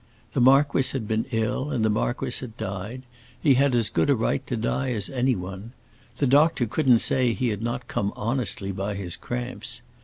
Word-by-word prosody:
The 130 - +1
marquis 135 +1 +5
had 120 -6 -3
been 110 +1 -1
ill, 115 +4 -1
and 120 -7 0
the - - +3
marquis 115 +3 -1
had 120 -3 -9
died; 100 +7 -5 0.4
he 140 0 +4
had 135 0 +3
as 115 -3 +3
good - - +1
a 140 - +5
right 115 - 0
to 125 - -2
die 130 +4 -1
as 105 0 -3
anyone. 115 -5 -2 0.4
The 140 - +1
doctor 145 0 +4
couldn't 125 +1 +3
say 125 -3 +2
he 125 +1 -1
had 105 -1 -3
not 120 +3 -3
come 100 0 -1
honestly 110 -3 -2
by 100 +2 -3
his 95 -4 -5
cramps. 120 0 -6
120 Hz, 190 wpm, -25 LUFS, 105-130 Hz, 0.4 s, marquis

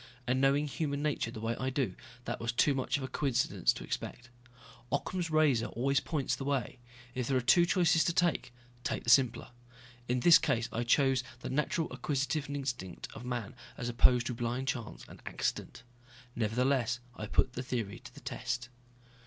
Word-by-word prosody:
And 130 +1 +1
knowing 140 +2 +3
human 145 0 -2
nature 150 -6 0
the 115 - -7
way 115 +1 -1
I 130 - 0
do, 130 0 -1 0.3
that - - -3
was 115 0 -1
too 140 +4 +3
much 135 0 0
of 140 - -5
a - - -2
coincidence 130 - +1
to - - -8
expect. 120 0 -5 0.6
Occam's 170 +5 -1
razor 150 -7 +3
always 135 +3 +1
points 150 -5 -1
the - - -6
way. 135 -3 -2 0.3
If 125 -2 -2
there 135 - +2
are - - +3
two 170 +8 +5
choices 170 -3 +4
to - - +3
take, 175 -7 +1 0.3
take - - -2
the 115 - +3
simpler. 125 -1 +4 0.6
In 125 0 0
this 170 +2 +8
case 120 -6 0
I 120 +1 -2
chose 135 +1 +3 0.2
the - - -5
natural 150 +3 0
acquisitive 145 +1 -1
instinct 125 -10 -4
of 115 - -9
man 120 -4 -4 0.2
as 120 - -3
opposed 120 0 +4
to 125 - -2
blind 120 +3 -2
chance 120 -4 -4
and - - -13
accident. 115 - -3 0.5
Nevertheless 120 +2 +1 0.2
I 105 - -5
put 125 - +2
the 125 - -3
theory 120 -5 -3
to - - -12
the - - -14
test. 120 0 -3
130 Hz, 185 wpm, -32 LUFS, 120-140 Hz, 0.6 s, this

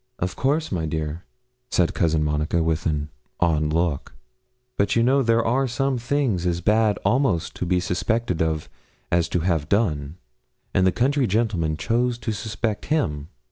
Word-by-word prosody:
'Of 90 0 -3
course, 150 +4 0
my 85 -4 -1
dear,' 80 +2 -4 0.4
said 90 -7 +2
Cousin 80 -2 +1
Monica, 75 +2 0
with 80 0 0
an 75 -1 -2 0.3
odd 75 -3 +2
look; 80 -3 -1 0.6
'but 100 - +1
you 115 - +4
know 135 +3 +4
there 115 -2 +2
are 130 +4 +2
some 130 +1 -1
things 120 -7 0
as 85 -1 0
bad 105 +3 +2
almost 110 - +1
to 90 - -3
be 90 0 +2
suspected 90 +1 -1
of 80 -1 -1 0.4
as 85 -2 +2
to 90 - 0
have 80 -4 0
done, 80 -8 0 0.6
and 95 - +3
the - - +4
country 135 +3 +1
gentlemen 95 -7 0
chose 120 +4 0
to 120 - -3
suspect 110 +1 -3
him. 75 - -1
90 Hz, 165 wpm, -23 LUFS, 80-115 Hz, 0.6 s, you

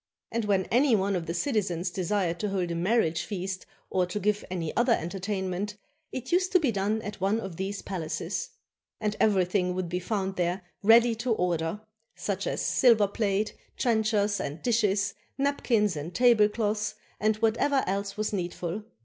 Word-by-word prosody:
And 230 -1 -1
when 195 -3 +2
any 250 0 +5
one 195 0 +1
of 170 -2 -3
the 170 - -2
citizens 185 - 0
desired 180 -1 -1
to 210 - -1
hold 185 -3 -1
a - - -2
marriage 170 -3 +2
feast 190 0 -4 0.2
or 185 -1 +2
to 180 +4 -3
give 210 +1 0
any 170 -4 -3
other 240 0 +4
entertainment, 195 +2 -3 0.3
it 260 - -5
used 365 +2 +2
to 365 - +7
be 285 -7 +1
done 210 +2 -1
at 205 -2 -7
one 200 +4 +2
of 190 -6 -6
these 195 +1 -3
palaces. 175 -5 -3 0.5
And 210 -1 -1
everything 180 -3 +2
would 185 -2 -2
be 180 +1 -1
found 190 0 -2
there 180 +1 0 0.2
ready 230 +3 +6
to 235 +1 0
order, 175 0 -1 0.3
such 200 -1 -3
as - - -1
silver 225 -5 +5
plate, 205 0 0 0.2
trenchers, 215 -3 +2
and 145 +3 -4
dishes, 205 -4 +2 0.2
napkins, 240 - +1
and 155 +4 -6
tablecloths, 215 -3 +3 0.2
and 215 0 +2
whatever 230 +6 +2
else 200 +1 -2
was 215 0 -1
needful. 175 +1 -3
200 Hz, 165 wpm, -28 LUFS, 180-220 Hz, 0.5 s, to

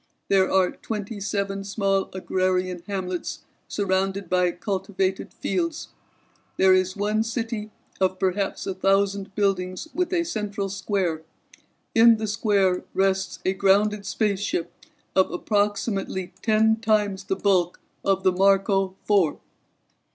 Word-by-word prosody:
There 190 -1 +4
are 190 -1 +3
twenty 210 -1 -5
seven 200 0 -2
small 195 -1 0
agrarian 185 -1 -1
hamlets 185 -3 -4 0.3
surrounded 195 -1 -1
by 180 -1 +3
cultivated 190 0 -2
fields. 335 -3 -2 0.7
There 190 0 +6
is 185 0 +2
one 210 +2 +1
city 225 -1 -3 0.3
of 185 -1 +1
perhaps 190 +1 -1
a 195 - -2
thousand 195 +1 +1
buildings 190 +2 -1
with 360 0 -1
a 345 -2 +2
central 205 -8 -3
square. 190 -4 -1 0.7
In 230 0 +7
the 220 - -3
square 205 -4 +1
rests 190 -1 +1
a 190 - +2
grounded 200 +1 +2
spaceship 200 -4 -1 0.4
of 190 - +4
approximately 205 -1 -1
ten 220 0 +3
times 210 -3 0
the 190 - -1
bulk 185 -3 +1 0.2
of 195 -1 +1
the 185 - +4
Marco 195 0 +2
Four." 195 -7 +2
195 Hz, 120 wpm, -24 LUFS, 190-210 Hz, 0.7 s, In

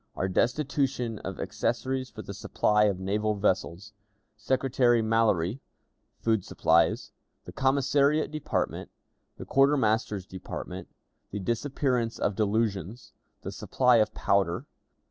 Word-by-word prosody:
Our 95 - -1
Destitution 125 +1 0
of 95 -1 -6
Accessories 130 -1 -2
for - - -9
the - - -7
Supply 105 0 +2
of 100 -3 0
Naval 105 +3 0
Vessels. 100 0 -1 0.4
Secretary 125 +1 +2
Mallory. 110 -2 +1 0.6
Food 110 -4 0
Supplies. 85 +1 +2 0.3
The - - -8
Commissariat 140 +3 +2
Department. 155 -1 -2 0.5
The - - -8
Quartermaster's 115 -8 +2
Department. 95 -1 -7 0.4
The 105 - -5
Disappearance 120 +2 -1
of 105 - 0
Delusions. 105 0 -1 0.3
The - - -5
Supply 125 -2 +2
of 110 - +2
Powder. 95 -3 +1
115 Hz, 110 wpm, -28 LUFS, 100-130 Hz, 0.6 s, Supply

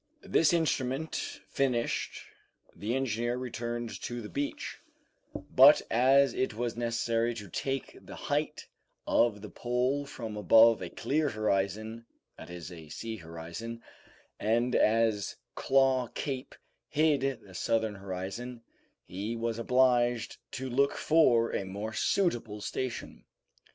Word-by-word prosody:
This 160 - +3
instrument 155 -3 0 0.3
finished, 125 -4 -1 0.5
the 110 +4 -2
engineer 120 -2 -1
returned 120 -2 -4
to 120 0 -4
the 105 - -7
beach, 145 0 -4 0.6
but - - +6
as 135 +4 +5
it 130 -4 -1
was 120 0 -2
necessary 115 0 0
to 105 -3 -7
take 135 +9 -4
the - - -10
height - - -2 0.4
of 105 -3 +2
the 105 - -7
pole 125 +4 -1
from 115 -5 -6
above 110 +2 +6
a 90 - -4
clear 150 - 0
horizon, 110 +1 -1 0.3
that - - -11
is, 90 0 -8
a 80 -3 -11
sea 115 +8 -5
horizon, 85 +7 -7 0.6
and 120 +3 +1
as 110 -2 +2 0.2
Claw 135 -2 +3
Cape 135 -2 -4 0.3
hid 140 -5 +1
the 95 -3 -15
southern 110 +3 0
horizon, 100 +5 -6 0.4
he 100 +6 -4
was 115 0 -2
obliged 120 -1 +2 0.2
to 130 +1 -4
look 140 +3 +2
for 125 -8 +4
a - - -1
more 100 +4 -5
suitable 120 - 0
station. 125 +4 -4
115 Hz, 125 wpm, -30 LUFS, 110-130 Hz, 0.6 s, but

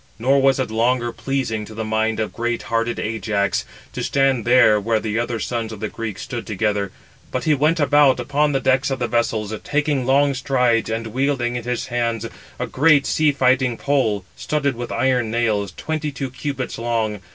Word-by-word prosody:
Nor 135 +5 +3
was 135 0 +3
it 130 -4 -1
longer 120 +2 +1
pleasing 125 -4 -2
to 110 - -11
the 110 - -3
mind 110 +1 0
of 110 - -2
great 120 0 -2
hearted 115 0 -1
Ajax 105 -2 -1 0.3
to - - -4
stand 135 -4 +1
there 120 -3 +5
where 110 +2 +1
the 110 0 -2
other 120 -1 -2
sons 115 0 -3
of 110 - -8
the 110 - -3
Greeks 110 -3 -5
stood 120 -3 -6
together; 105 -2 -1 0.4
but 130 - -3
he 155 - +3
went 155 +4 +2
about 145 -3 +4
upon 145 +4 +1
the 135 - +1
decks 130 +2 +2
of 135 - -1
the 120 -2 -1
vessels, 110 -3 -1
taking 145 -3 0
long 140 +1 +4
strides, 125 -4 +1
and 115 +1 -2
wielding 125 +1 -1
in 120 -1 -4
his 125 0 -2
hands 115 -2 -1 0.3
a 125 - -2
great 145 +3 +3
sea 155 -1 +2
fighting 130 -3 +2
pole, 110 -9 0
studded 140 -3 -1
with 120 0 -6
iron 125 -4 +1
nails, 110 -4 0
twenty 155 -1 -3
two 135 -2 -5
cubits 130 -2 -4
long. 115 -3 -1
120 Hz, 190 wpm, -21 LUFS, 110-135 Hz, 0.4 s, there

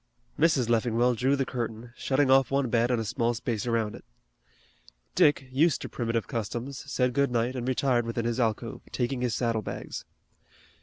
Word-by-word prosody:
Mrs. 150 -7 +3
Leffingwell 120 +1 +2
drew 130 +4 +2
the 135 -1 0
curtain 120 -1 -5
shutting 135 0 +1
off 135 -2 +5
one 135 -3 0
bed 120 0 +3
and 125 -2 +1
a 110 - -2
small 120 +1 0
space 115 -1 -3
around 115 -2 0
it. - - -11 1.1
Dick, 135 -3 +3
used 150 +4 +3
to - - -5
primitive 115 -2 -1
customs, 120 +5 -4
said 125 -1 +1
good 140 +1 +2
night 120 +1 0
and 125 -1 -3
retired 125 -2 +1
within 115 0 -2
his 120 +1 -1
alcove, 115 -1 -1
taking 125 0 -1
his 120 -4 0
saddle 115 -3 0
bags. - - -6
120 Hz, 175 wpm, -28 LUFS, 115-130 Hz, 1.1 s, off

